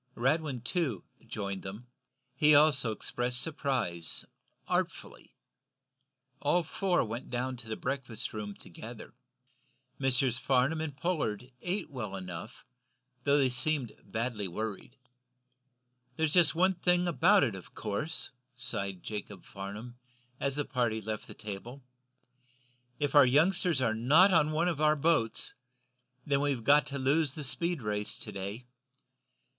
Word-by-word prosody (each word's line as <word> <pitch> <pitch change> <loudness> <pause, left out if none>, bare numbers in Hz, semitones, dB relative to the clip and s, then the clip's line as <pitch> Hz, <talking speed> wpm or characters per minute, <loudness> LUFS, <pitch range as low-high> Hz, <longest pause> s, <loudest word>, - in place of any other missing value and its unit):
Radwin, 135 -1 0
too, 130 - -1 0.2
joined 100 -2 -4
them. 100 +5 -8 0.5
He 150 0 +5
also 145 -5 +5
expressed 120 +3 -1
surprise, 130 - -2 0.4
artfully. - - -3 1.0
All 175 +5 +2
four 180 +1 +1
went 115 +3 -6
to 125 -1 -3
the 110 - -2
breakfast 125 -3 -4
room 105 -2 -5
together. 110 +7 -10 0.9
Messrs. 130 -2 +2
Farnum 135 +5 +2
and 150 -4 -4
Pollard 135 - -1
ate 180 -3 -2
well 110 -7 -4
enough, 95 +4 -7 0.6
though 140 0 +5
they 135 -3 +3
seemed 135 -2 0
badly 110 -3 -2
worried. 110 +5 -5 1.2
"There's 160 +1 +1
just 165 -4 +5
one 185 +3 +4
thing 180 0 +2
about 185 +4 +5
it, 120 -6 +1
of 95 -2 -11
course," 110 +10 -3 0.2
sighed 100 -7 -3
Jacob 105 -2 -6
Farnum, 105 +5 -8 0.4
as 140 -1 -1
the 145 -1 -1
party 120 -5 0
left 110 0 -5
the - - -10
table. 110 +6 -7 1.1
"If 145 -2 -1
our 145 -3 +8
youngsters 160 +1 +3
are 110 - +2
not 150 - +6
on 155 -3 +5
one 160 +3 +1
of 165 -4 -1
our 155 0 +5
boats, 150 -7 +1 0.7
then 140 -1 +2
we've 140 -5 0
got 145 +4 +5
to 140 - -4
lose 140 +2 +2
the 155 - -4
speed 170 +1 -1
race 105 -1 -2
to - - -6
day. 100 +5 -5
130 Hz, 135 wpm, -31 LUFS, 110-155 Hz, 1.2 s, our